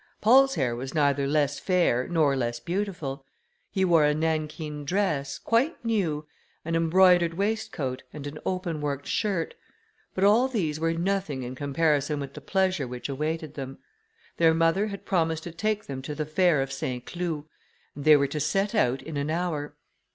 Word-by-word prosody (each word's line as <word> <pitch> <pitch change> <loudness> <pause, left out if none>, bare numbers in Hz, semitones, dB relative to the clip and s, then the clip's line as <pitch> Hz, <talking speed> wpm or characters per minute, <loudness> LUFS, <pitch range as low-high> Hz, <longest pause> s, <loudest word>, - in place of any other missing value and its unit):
Paul's 270 +5 +5
hair 125 -4 0
was 130 +4 -6
neither 140 -2 +2
less 145 -1 +1
fair 175 -10 +2
nor 155 -5 +2
less 120 -2 -2
beautiful; 165 -4 -3 0.5
he 190 -1 +1
wore 170 -4 +5
a 150 0 +3
nankeen 155 -1 -2
dress, 150 -4 -1
quite 240 +4 0
new, 170 -10 0 0.4
an 165 +1 -1
embroidered 170 0 +4
waistcoat, 200 -10 -2
and 150 -2 -8
an 145 +1 -6
open 180 -4 -2
worked 140 -1 -3
shirt; 195 -4 -1 0.6
but 190 - 0
all 220 +6 +5
these 170 - -2
were 165 +1 +1
nothing 175 -6 -1
in 125 +1 -5
comparison 145 +1 0
with 140 -1 -6
the - - -9
pleasure 190 -7 0
which 125 +2 -6
awaited 155 +2 -3
them. 135 -2 -6 0.6
Their 165 -1 +4
mother 165 +5 +2
had 200 -2 -7
promised 160 -3 0
to 170 - -6
take 215 +5 -1
them 135 -1 -5
to 145 +3 -5
the 155 0 -2
fair 155 -2 +3
of 135 0 -6
Saint 125 -2 -4
Cloud, 170 -4 -3 0.5
and 145 - -8
they 155 0 +7
were 140 - +2
to 150 +2 -3
set 195 +7 0
out 130 - +1
in 160 -2 -6
an 140 +1 -2
hour. 160 -3 -2
160 Hz, 175 wpm, -27 LUFS, 140-185 Hz, 0.6 s, they